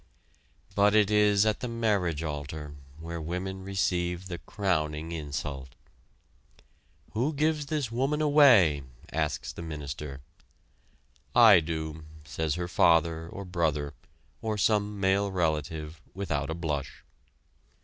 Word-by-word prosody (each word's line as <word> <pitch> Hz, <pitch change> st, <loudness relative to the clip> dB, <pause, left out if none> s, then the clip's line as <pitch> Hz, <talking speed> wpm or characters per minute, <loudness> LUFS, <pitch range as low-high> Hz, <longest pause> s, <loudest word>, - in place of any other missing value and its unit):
But 100 Hz, +1 st, +4 dB
it 105 Hz, -1 st, +4 dB
is 105 Hz, -1 st, +4 dB
at 110 Hz, -1 st, +1 dB
the 125 Hz, -, -4 dB
marriage 100 Hz, -9 st, 0 dB
altar, 75 Hz, -1 st, -5 dB, 0.3 s
where 85 Hz, 0 st, -6 dB
women 90 Hz, +4 st, -4 dB
receive 90 Hz, -2 st, -1 dB
the 85 Hz, -2 st, -5 dB
crowning 80 Hz, -6 st, -2 dB
insult. 70 Hz, -4 st, -5 dB, 1.4 s
"Who 125 Hz, +8 st, 0 dB
gives 150 Hz, 0 st, 0 dB
this 145 Hz, -6 st, -2 dB
woman 135 Hz, +5 st, 0 dB
away?" 130 Hz, -, +6 dB, 0.3 s
asks -, -, -2 dB
the -, -, -8 dB
minister. 75 Hz, -3 st, -6 dB, 1.1 s
"I 110 Hz, -6 st, +9 dB
do," 80 Hz, -1 st, -4 dB, 0.2 s
says 75 Hz, +1 st, -2 dB
her 90 Hz, 0 st, -3 dB
father 80 Hz, -1 st, +3 dB
or 100 Hz, +2 st, -7 dB
brother, 80 Hz, -5 st, -1 dB, 0.5 s
or 110 Hz, -1 st, -2 dB
some 105 Hz, 0 st, +1 dB
male 100 Hz, +1 st, +2 dB
relative, 80 Hz, -2 st, -2 dB
without 100 Hz, -3 st, -2 dB
a 80 Hz, -, -2 dB
blush. 75 Hz, -5 st, -4 dB
85 Hz, 120 wpm, -28 LUFS, 80-105 Hz, 1.4 s, I